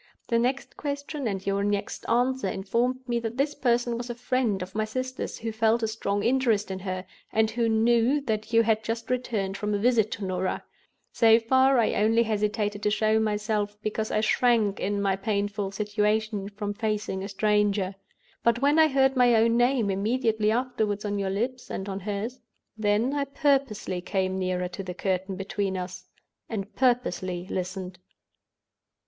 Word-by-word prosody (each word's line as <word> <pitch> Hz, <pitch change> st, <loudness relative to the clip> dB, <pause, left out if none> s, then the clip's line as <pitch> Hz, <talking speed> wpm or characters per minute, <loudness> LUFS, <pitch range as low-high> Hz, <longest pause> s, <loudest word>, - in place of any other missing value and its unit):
Her 230 Hz, -, +4 dB
next 255 Hz, +3 st, -1 dB
question 285 Hz, -1 st, -4 dB
and 195 Hz, -2 st, -3 dB
your 200 Hz, 0 st, 0 dB
next 205 Hz, 0 st, -2 dB
answer 250 Hz, -1 st, +2 dB
informed 240 Hz, +7 st, -1 dB
me 240 Hz, -1 st, 0 dB
that 230 Hz, +1 st, -5 dB
this 285 Hz, +2 st, +1 dB
person 240 Hz, -2 st, +1 dB
was 245 Hz, 0 st, -6 dB
a 240 Hz, -, -3 dB
friend 240 Hz, -5 st, 0 dB
of 185 Hz, +1 st, -10 dB
my 215 Hz, +1 st, 0 dB
sister's, 255 Hz, +4 st, -4 dB
who 225 Hz, 0 st, -4 dB
felt 225 Hz, +1 st, +2 dB
a -, -, +2 dB
strong 205 Hz, -2 st, -2 dB
interest 230 Hz, -4 st, +2 dB
in 190 Hz, -, -4 dB
her, 185 Hz, -1 st, -4 dB, 0.3 s
and 220 Hz, 0 st, +2 dB
who 230 Hz, 0 st, +1 dB
knew 235 Hz, +5 st, +3 dB
that 220 Hz, -4 st, -3 dB
you 230 Hz, 0 st, +5 dB
had 220 Hz, -1 st, +1 dB
just 230 Hz, +2 st, -3 dB
returned 215 Hz, -6 st, -1 dB
from 210 Hz, +1 st, -1 dB
a -, -, +1 dB
visit 220 Hz, 0 st, +3 dB
to 205 Hz, -, -5 dB
Norah. 185 Hz, 0 st, -2 dB, 0.5 s
So 225 Hz, -1 st, +6 dB
far, 260 Hz, +3 st, +4 dB
I 230 Hz, -, +3 dB
only 225 Hz, +3 st, +3 dB
hesitated 210 Hz, -1 st, -1 dB
to 210 Hz, -, +2 dB
show 215 Hz, +1 st, +2 dB
myself, 210 Hz, -1 st, -1 dB
because 215 Hz, 0 st, -2 dB
I 215 Hz, -, +1 dB
shrank, 220 Hz, -3 st, +2 dB
in 200 Hz, 0 st, -1 dB
my 195 Hz, -1 st, +2 dB
painful 200 Hz, 0 st, -2 dB
situation, 210 Hz, 0 st, -1 dB
from 205 Hz, 0 st, -4 dB
facing 210 Hz, -3 st, -2 dB
a 200 Hz, -, -5 dB
stranger. 205 Hz, -1 st, +1 dB, 0.5 s
But 235 Hz, 0 st, +3 dB
when 290 Hz, +4 st, +3 dB
I 315 Hz, -, +7 dB
heard 270 Hz, -2 st, +3 dB
my 245 Hz, -2 st, +5 dB
own 230 Hz, +1 st, +4 dB
name 240 Hz, -3 st, +2 dB
immediately 220 Hz, +1 st, +1 dB
afterward 220 Hz, -3 st, -1 dB
on 205 Hz, 0 st, -1 dB
your 195 Hz, -1 st, -1 dB
lips 245 Hz, +6 st, -3 dB
and 190 Hz, -, -4 dB
on 195 Hz, -1 st, -3 dB
hers, 210 Hz, +6 st, -4 dB, 0.4 s
then 215 Hz, +4 st, +1 dB
I 285 Hz, -1 st, 0 dB
purposely 275 Hz, -, 0 dB
came 190 Hz, +1 st, -1 dB
nearer 180 Hz, -1 st, -1 dB
to 180 Hz, +2 st, -6 dB
the 180 Hz, -2 st, -6 dB
curtain 190 Hz, 0 st, -1 dB
between 195 Hz, 0 st, -2 dB
us, 180 Hz, 0 st, -6 dB, 0.4 s
and 210 Hz, -2 st, -4 dB
purposely 185 Hz, -8 st, 0 dB
listened. 185 Hz, 0 st, -4 dB
215 Hz, 175 wpm, -27 LUFS, 200-240 Hz, 0.5 s, I